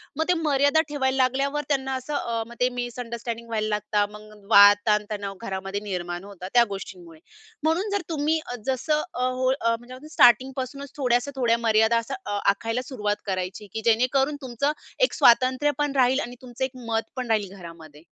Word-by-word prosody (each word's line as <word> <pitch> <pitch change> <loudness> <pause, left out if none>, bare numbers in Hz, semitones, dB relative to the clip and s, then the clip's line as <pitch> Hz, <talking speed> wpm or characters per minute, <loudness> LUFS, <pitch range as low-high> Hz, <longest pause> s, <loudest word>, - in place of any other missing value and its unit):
मग 315 - +1
ते - - +6
मर्यादा 300 -2 +3
ठेवायला 265 -3 0
लागल्यावर 275 +3 +1
त्यांना 265 -2 0
असं 260 +3 -4
अ, 230 -4 -2
मग 235 - -11
ते 250 - +3
मिसअंडरस्टँडिंग 235 -1 -5
व्हायला 215 -2 -1
लागतात. 210 -1 0
मग 210 -1 -14
वाद 205 0 +9
ताणतणाव 210 -2 0
घरामध्ये 195 -1 -4
निर्माण 175 -3 -4
होतात 195 -2 -9
त्या 240 -1 +7
गोष्टींमुळे. 180 -4 -8 0.4
म्हणून 330 +7 +1
जर 405 - 0
तुम्ही 315 0 0 0.3
जसं 300 +4 0
अ, 250 - -1
हो 255 0 0
म्हणजे 265 -3 -1
म्हणतात 250 +2 -12
ना 300 - -12
असं 310 - -12
स्टार्टिंग 245 +2 +5
पासूनच 275 +1 -6
थोड्याशा 250 0 +1
थोड्या 235 -3 +2
मर्यादा 220 +1 +4 0.3
अ, 205 - -2 0.2
आखायला 225 +4 -3
सुरुवात 210 -6 -2
करायची 190 +1 -4
की 220 - -3
जेणेकरून 255 +5 +2
तुमचं 260 +3 -1 0.3
एक - - +3
स्वातंत्र्य 255 +4 +5
पण 295 -1 0
राहील 260 0 +3
आणि 245 -3 -5
तुमचं 250 +1 -6
एक 260 - -6 0.2
मतपण 230 +3 -3
राहील 205 -3 0
घरामध्ये. 165 -4 -12
240 Hz, 175 wpm, -25 LUFS, 210-270 Hz, 0.4 s, वाद